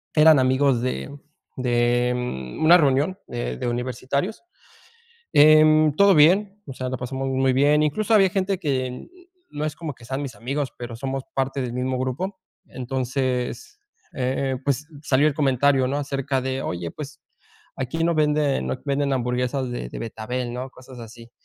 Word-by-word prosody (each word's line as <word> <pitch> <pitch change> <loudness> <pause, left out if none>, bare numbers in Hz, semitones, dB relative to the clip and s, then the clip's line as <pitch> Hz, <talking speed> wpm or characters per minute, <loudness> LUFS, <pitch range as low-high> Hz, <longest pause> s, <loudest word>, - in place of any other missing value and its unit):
eran 155 -2 +7
amigos 130 -1 +2
de 140 +3 -4 0.4
de 120 0 +1 0.5
una 170 +3 +7
reunión 145 +4 +2
de - - -4
de - - -3
universitarios. 130 - -3 0.9
Em, 155 0 +6
todo 200 +2 +6
bien, 195 +7 +4
o 135 - -6
sea, 130 0 -4
la 130 - -3
pasamos 130 +2 -4
muy 130 0 +1
bien, 145 +3 +4
incluso, 200 +9 0
había 195 -3 +6
gente 190 0 -1
que 130 -6 -3 0.4
no 150 +1 -5
es 155 0 -3
como 160 -4 -6
que 120 - -19
sean 135 +4 -3
mis 135 -3 -6
amigos, 135 +3 -3
pero 120 -1 -7
somos 135 +2 -4
parte 135 +1 -1
del 125 -2 -3
mismo 130 +1 -2
grupo. 135 +10 -3 0.3
Entonces, 130 - -3 0.4
eh, 130 0 -1
pues, 140 +1 0 0.2
salió 145 +1 +3
el 150 - 0
comentario, 135 -2 +2
¿no? 140 - -1
Acerca 135 -1 -2
de: 130 +1 -3
"Oye, 85 -1 -4
pues, 150 0 -9 0.6
aquí 135 +6 -2
no 170 0 +2
venden 150 - +1
no 65 - -1
venden 140 -1 0
hamburguesas 125 +1 -1
de 90 - -4
de - - -8
betabel", 120 +2 -4
¿no?, 125 +2 -5
cosas 130 -1 -13
así. 115 +1 -12
135 Hz, 160 wpm, -23 LUFS, 125-150 Hz, 0.9 s, eran